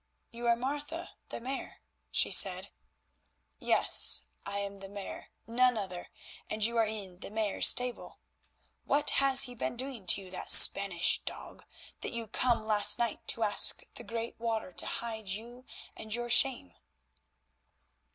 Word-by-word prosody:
"You 235 Hz, +1 st, -7 dB
are 235 Hz, -, +2 dB
Martha 295 Hz, +7 st, -7 dB, 0.2 s
the -, -, -7 dB
Mare," 260 Hz, +3 st, -9 dB, 0.3 s
she -, -, 0 dB
said. -, -, +3 dB, 0.9 s
"Yes, -, -, +2 dB, 0.2 s
I 200 Hz, 0 st, -6 dB
am 200 Hz, 0 st, -7 dB
the 195 Hz, 0 st, -11 dB
Mare, 200 Hz, -1 st, -10 dB, 0.2 s
none 250 Hz, +1 st, 0 dB
other, 185 Hz, -4 st, -8 dB, 0.4 s
and 215 Hz, 0 st, -2 dB
you 235 Hz, +1 st, -4 dB
are 225 Hz, -1 st, +1 dB
in 200 Hz, -4 st, -7 dB
the -, -, -9 dB
Mare's 215 Hz, -1 st, +1 dB
stable. 250 Hz, -1 st, 0 dB, 0.7 s
What 295 Hz, +1 st, -2 dB
has 270 Hz, -1 st, +8 dB
he 250 Hz, -, -5 dB
been 240 Hz, 0 st, -6 dB
doing 255 Hz, -6 st, -7 dB
to 200 Hz, -, +2 dB
you, 185 Hz, -, -15 dB
that 185 Hz, -, -9 dB
Spanish 190 Hz, -4 st, +7 dB
dog, -, -, -8 dB, 0.3 s
that -, -, -6 dB
you 230 Hz, -1 st, -6 dB
came 235 Hz, +2 st, -1 dB
last 215 Hz, -1 st, +4 dB
night 235 Hz, -2 st, -5 dB
to 230 Hz, -, -3 dB
ask 205 Hz, -1 st, +4 dB
the -, -, -11 dB
Great 230 Hz, 0 st, -8 dB
Water 225 Hz, -5 st, -5 dB
to -, -, -2 dB
hide 220 Hz, -3 st, -7 dB
you 240 Hz, +6 st, -8 dB, 0.3 s
and 220 Hz, 0 st, -4 dB
your 240 Hz, 0 st, -6 dB
shame?" 265 Hz, +2 st, +1 dB
230 Hz, 155 wpm, -28 LUFS, 205-245 Hz, 0.9 s, has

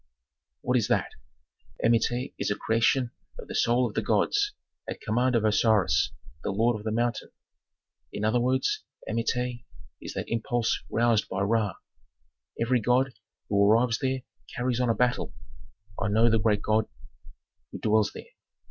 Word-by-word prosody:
"What 125 Hz, -, +1 dB
is 115 Hz, -, +1 dB
that? -, -, +1 dB, 0.7 s
"Amenti 120 Hz, +3 st, +1 dB
is -, -, -1 dB
a 100 Hz, -, 0 dB
creation 115 Hz, +3 st, +1 dB, 0.3 s
of -, -, -9 dB
the -, -, -7 dB
soul 120 Hz, +2 st, +2 dB
of 105 Hz, -, -8 dB
the -, -, 0 dB
gods, 410 Hz, 0 st, +1 dB, 0.4 s
at -, -, -5 dB
command 120 Hz, +3 st, +1 dB
of 110 Hz, -2 st, +2 dB
Osiris, 110 Hz, -2 st, +3 dB, 0.3 s
the -, -, -3 dB
lord 115 Hz, +4 st, +2 dB
of 105 Hz, -, -7 dB
the 110 Hz, -, -2 dB
mountain. 120 Hz, +2 st, -1 dB, 0.8 s
"In 105 Hz, -, -3 dB
other 110 Hz, +3 st, +2 dB
words, 130 Hz, +2 st, 0 dB, 0.2 s
Amenti 120 Hz, +2 st, -1 dB, 0.4 s
is -, -, -7 dB
that -, -, -3 dB
impulse 115 Hz, 0 st, 0 dB
roused 115 Hz, -2 st, +2 dB
by 95 Hz, +1 st, -2 dB
Ra. 105 Hz, -1 st, +1 dB, 0.8 s
Every 120 Hz, +2 st, +2 dB
god 125 Hz, +4 st, +2 dB, 0.3 s
who 100 Hz, 0 st, +3 dB
arrives 115 Hz, +3 st, +3 dB
there 130 Hz, -2 st, -1 dB, 0.3 s
carries 125 Hz, 0 st, -1 dB
on 125 Hz, -1 st, +1 dB
a 115 Hz, -, +2 dB
battle. 125 Hz, 0 st, 0 dB, 0.7 s
I 100 Hz, -, +1 dB
know 110 Hz, +3 st, +4 dB
the 115 Hz, -, +3 dB
great 105 Hz, -1 st, +1 dB
god 110 Hz, 0 st, +2 dB, 0.8 s
who -, -, -6 dB
dwells 110 Hz, -1 st, +2 dB
there. -, -, -11 dB
115 Hz, 155 wpm, -27 LUFS, 110-125 Hz, 0.8 s, know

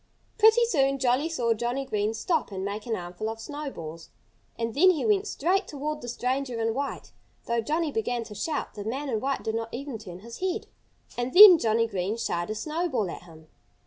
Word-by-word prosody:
Pretty 445 Hz, +2 st, +6 dB
soon 275 Hz, -, +2 dB
Jolly 260 Hz, +4 st, +1 dB
saw 240 Hz, -8 st, +1 dB
Johnnie 240 Hz, +4 st, -2 dB
Green 215 Hz, -2 st, -1 dB
stop 295 Hz, -, -1 dB
and 190 Hz, 0 st, -4 dB
make 210 Hz, +3 st, -5 dB
an 225 Hz, -, 0 dB
armful 180 Hz, +4 st, -5 dB
of 225 Hz, 0 st, -6 dB
snowballs. 225 Hz, -, -7 dB, 0.5 s
And 230 Hz, -1 st, -2 dB
then 360 Hz, +7 st, +6 dB
he 340 Hz, -5 st, +1 dB
went 415 Hz, -1 st, +2 dB
straight 375 Hz, +3 st, 0 dB
toward 300 Hz, +1 st, -4 dB
the -, -, -7 dB
stranger 250 Hz, 0 st, -2 dB
in 225 Hz, 0 st, 0 dB
white. 280 Hz, +3 st, -4 dB, 0.3 s
Though 235 Hz, 0 st, 0 dB
Johnnie 310 Hz, +6 st, -1 dB
began 235 Hz, 0 st, -1 dB
to 220 Hz, -2 st, -10 dB
shout, 295 Hz, +8 st, -3 dB
the 205 Hz, -, -7 dB
man 265 Hz, +7 st, -3 dB
in 225 Hz, -4 st, 0 dB
white 275 Hz, +4 st, -2 dB
did 220 Hz, -, -2 dB
not 225 Hz, 0 st, -3 dB
even 265 Hz, -2 st, -6 dB
turn 180 Hz, -3 st, -10 dB
his 230 Hz, +2 st, -10 dB
head. 370 Hz, -1 st, -2 dB, 0.5 s
And 245 Hz, +1 st, -2 dB
then 375 Hz, -3 st, +11 dB
Johnnie 230 Hz, -1 st, +2 dB
Green 200 Hz, 0 st, -2 dB
shied 175 Hz, -6 st, -2 dB
a 215 Hz, -, -2 dB
snowball 300 Hz, -, -2 dB
at -, -, -8 dB
him. 160 Hz, -2 st, -15 dB
240 Hz, 205 wpm, -27 LUFS, 220-300 Hz, 0.5 s, then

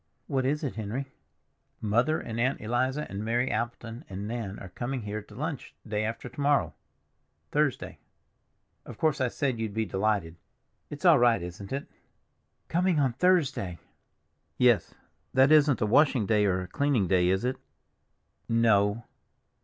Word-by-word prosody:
"What 130 Hz, -2 st, 0 dB
is 150 Hz, +3 st, -1 dB
it, 135 Hz, -5 st, -3 dB
Henry?" 120 Hz, +6 st, -4 dB, 0.7 s
"Mother 120 Hz, +9 st, +1 dB
and 115 Hz, 0 st, -5 dB
Aunt 130 Hz, +3 st, +1 dB
Eliza 130 Hz, +6 st, -1 dB
and 100 Hz, +2 st, -5 dB
Mary 120 Hz, +3 st, 0 dB
Appleton 115 Hz, +2 st, -4 dB
and 100 Hz, +2 st, -5 dB
Nan 110 Hz, -4 st, -4 dB
are 95 Hz, -, -9 dB
coming 120 Hz, +5 st, -4 dB
here 105 Hz, +1 st, -4 dB
to 105 Hz, 0 st, -16 dB
lunch 150 Hz, +2 st, -5 dB
day 105 Hz, 0 st, -1 dB
after 115 Hz, +3 st, -4 dB
to 125 Hz, +4 st, -8 dB
morrow—Thursday. 145 Hz, 0 st, -2 dB, 0.8 s
Of -, -, -10 dB
course 155 Hz, -4 st, +1 dB
I 130 Hz, -, +3 dB
said 130 Hz, -1 st, -2 dB
you'd 110 Hz, -2 st, -3 dB
be 110 Hz, 0 st, 0 dB
delighted. 95 Hz, -4 st, -1 dB, 0.5 s
It's 145 Hz, +4 st, -7 dB
all 165 Hz, -6 st, +7 dB
right, 120 Hz, -6 st, +3 dB
isn't 90 Hz, +3 st, -8 dB
it?" 140 Hz, +1 st, -3 dB, 0.8 s
"Coming 175 Hz, -1 st, +1 dB
on 135 Hz, -4 st, +2 dB
Thursday!" 135 Hz, -, +1 dB, 0.8 s
"Yes. 120 Hz, -7 st, +3 dB, 0.4 s
That 135 Hz, +2 st, +5 dB
isn't 150 Hz, -4 st, +5 dB
a -, -, +3 dB
washing 125 Hz, 0 st, +3 dB
day 105 Hz, -1 st, +3 dB
or 90 Hz, -1 st, +1 dB
a -, -, -8 dB
cleaning 135 Hz, -2 st, +1 dB
day, 90 Hz, -1 st, +3 dB
is 95 Hz, +5 st, +1 dB
it?" 130 Hz, +1 st, -1 dB, 0.9 s
"No." 110 Hz, -1 st, +3 dB
120 Hz, 155 wpm, -28 LUFS, 105-135 Hz, 0.9 s, all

